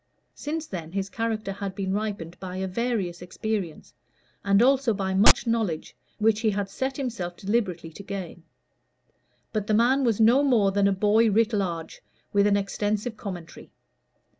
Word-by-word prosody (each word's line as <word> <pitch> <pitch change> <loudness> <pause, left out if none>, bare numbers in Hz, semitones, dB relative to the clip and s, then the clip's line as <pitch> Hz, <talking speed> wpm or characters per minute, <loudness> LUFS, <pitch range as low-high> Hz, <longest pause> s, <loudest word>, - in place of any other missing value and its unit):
Since 315 +2 -4
then 170 - -7
his 195 0 -2
character 220 -3 -2
had 195 -1 -5
been 190 -1 -2
ripened 200 -5 -3
by 185 -1 -6
a 190 0 -2
various 190 -4 -2
experience, 180 - -4 0.5
and 200 0 +4
also 265 -3 +3
by 190 -1 -2
much 195 +3 +6
knowledge 220 -9 -1 0.2
which 220 0 +2
he 225 -1 +2
had 200 -1 -2
set 265 +4 -3
himself 225 -10 -4
deliberately 190 -6 -1
to 180 - -10
gain. 190 -3 -6 1.1
But 210 -2 -2
the 215 - +2
man 255 +5 +3
was 230 -4 +1
no 235 +6 +5
more 225 -8 +3
than 200 0 +2
the 200 - +4
boy 210 +4 +3
writ 225 +2 +2
large, 175 -5 -3 0.3
with 200 0 +4
an 200 0 +3
extensive 210 +3 -2
commentary. 180 -6 -8
205 Hz, 165 wpm, -26 LUFS, 190-225 Hz, 1.1 s, much